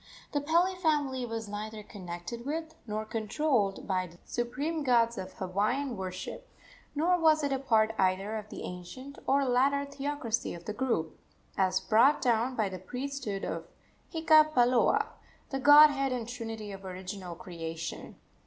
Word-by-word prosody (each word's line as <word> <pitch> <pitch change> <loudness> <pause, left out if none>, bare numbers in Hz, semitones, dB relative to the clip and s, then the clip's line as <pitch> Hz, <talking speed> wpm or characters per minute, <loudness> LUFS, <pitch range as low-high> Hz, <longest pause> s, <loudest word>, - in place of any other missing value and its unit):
The 290 - 0
Pele 340 +5 +3
family 290 -8 0
was 225 -1 -4
neither 210 +1 -6
connected 185 +3 -7
with, 315 +3 -4
nor 215 0 -3
controlled 220 -1 0
by, 185 -1 0
the 170 0 -16
supreme 285 +7 -2
gods 235 -3 +3
of 190 -4 -6
Hawaiian 215 +8 -1
worship, 185 -1 -6 0.5
nor 350 +4 +3
was 315 -2 +4
it 285 -1 +1
a 265 - 0
part 225 -4 +3
either 190 +3 +1
of 215 0 -11
the - - -7
ancient 255 +11 -8
or 275 0 +3
later 275 +3 +2
theocracy 280 -7 -3
of 170 - -11
the 210 - -3
group, 210 -11 -1 0.4
as 190 -1 +2
brought 225 +9 +4
down 240 +1 +1
by 215 -3 +1
the 185 -1 -6
priesthood 250 -1 -4
of - - -4 0.4
Hika 310 -2 +5
paloa, 245 -1 +4 0.5
the 270 - -1
godhead 290 -1 +7
and 240 -3 -2
trinity 225 -3 -6
of 195 0 -9
original 185 -1 -6
creation. 165 -2 -6
235 Hz, 155 wpm, -30 LUFS, 195-280 Hz, 0.5 s, godhead